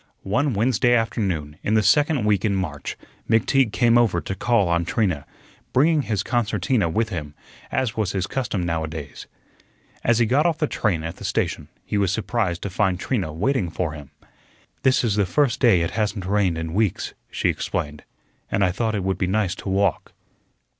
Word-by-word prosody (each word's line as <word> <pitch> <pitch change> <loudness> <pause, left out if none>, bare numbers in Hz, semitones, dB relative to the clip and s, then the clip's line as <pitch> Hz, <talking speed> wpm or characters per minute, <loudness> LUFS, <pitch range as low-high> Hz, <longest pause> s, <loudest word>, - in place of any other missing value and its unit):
One 130 +6 0
Wednesday 120 +2 +3
afternoon 95 -10 -1
in 110 - 0
the 110 - +4
second 145 -1 +3
week 105 -3 +2
in 105 -3 +1
March 80 -7 -4 0.3
McTeague 115 +2 +3
came 120 0 +4
over 110 -7 +2
to 95 - -4
call 105 0 +2
on 85 0 +1
Trina, 85 -6 -1 0.5
bringing 150 +4 +4
his 105 -7 -1
concertina 120 - 0
with 110 +6 0
him, 75 -7 -5 0.4
as 130 -4 -1
was 105 -5 0
his 95 -2 -1
custom 120 -6 -2
nowadays. 80 -3 -4 0.8
As 120 -1 +3
he 120 - +3
got 140 +8 +3
off 165 -2 0
the 155 - +1
train 95 - -1
at 80 0 -5
the - - -10
station - - -1 0.2
he 105 - -1
was 95 -3 +2
surprised 105 -3 -1
to 100 - -3
find 95 -1 +1
Trina 95 -8 -1
waiting 100 - 0
for 80 0 -2
him. 75 -3 -10 0.7
"This 130 -1 +3
is 110 -4 +1
the 100 -3 +2
first 140 +5 +1
day 115 -9 +5
it 85 - -1
hasn't 105 -3 -2
rained 95 -3 +1
in 80 0 -4
weeks," 105 -1 0 0.2
she - - 0
explained, 75 0 -3 0.5
"an' 100 - +1
I 90 - +3
thought 110 +3 -1
it 100 - -2
would 95 0 -1
be 90 - +1
nice 100 -1 +1
to 95 - -7
walk." 95 -2 0
100 Hz, 190 wpm, -23 LUFS, 90-115 Hz, 0.8 s, day